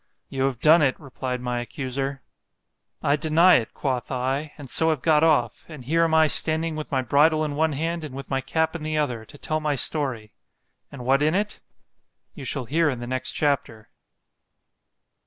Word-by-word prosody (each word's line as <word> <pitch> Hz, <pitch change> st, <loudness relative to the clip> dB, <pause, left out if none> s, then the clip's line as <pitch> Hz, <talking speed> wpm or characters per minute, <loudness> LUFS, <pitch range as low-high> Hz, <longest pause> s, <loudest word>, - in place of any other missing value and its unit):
You 135 Hz, -1 st, -1 dB
have 135 Hz, -3 st, -2 dB
done 155 Hz, +4 st, +6 dB
it, 135 Hz, -3 st, +1 dB
replied 130 Hz, -3 st, -5 dB
my 125 Hz, -1 st, -2 dB
accuser. 135 Hz, +1 st, -4 dB, 0.8 s
I 140 Hz, -, +3 dB
deny 160 Hz, +4 st, +5 dB
it, 115 Hz, -, -4 dB
quoth 130 Hz, -4 st, -2 dB
I, 135 Hz, +4 st, -2 dB
and 145 Hz, -3 st, -9 dB
so 160 Hz, +5 st, +3 dB
have 155 Hz, -5 st, -1 dB
got 155 Hz, -1 st, +4 dB
off, 145 Hz, -8 st, +1 dB
and 150 Hz, -6 st, -10 dB
here 165 Hz, +5 st, +2 dB
am 160 Hz, -1 st, +1 dB
I 160 Hz, 0 st, +6 dB
standing 160 Hz, +1 st, 0 dB
with 155 Hz, 0 st, -6 dB
my 130 Hz, -2 st, 0 dB
bridle 155 Hz, +5 st, +3 dB
in 145 Hz, -1 st, -4 dB
one 160 Hz, +1 st, +1 dB
hand, 165 Hz, +3 st, -2 dB
and 145 Hz, -4 st, -7 dB
with 135 Hz, -1 st, -7 dB
my 135 Hz, -1 st, -1 dB
cap 160 Hz, +5 st, -1 dB
in 165 Hz, -, -5 dB
the 155 Hz, 0 st, -2 dB
other, 125 Hz, -7 st, -2 dB
to 145 Hz, -, -14 dB
tell 155 Hz, +2 st, -2 dB
my 150 Hz, -2 st, -1 dB
story.——And 130 Hz, -1 st, -5 dB
what 135 Hz, +2 st, +3 dB
in 155 Hz, +3 st, +2 dB
it? 210 Hz, +1 st, -2 dB, 0.7 s
You 140 Hz, -, -9 dB
shall 130 Hz, 0 st, -3 dB
hear 160 Hz, +6 st, +2 dB
in 130 Hz, -4 st, -3 dB
the 120 Hz, -, -6 dB
next 130 Hz, +1 st, -2 dB
chapter. 135 Hz, -7 st, -2 dB
145 Hz, 195 wpm, -24 LUFS, 130-155 Hz, 0.8 s, done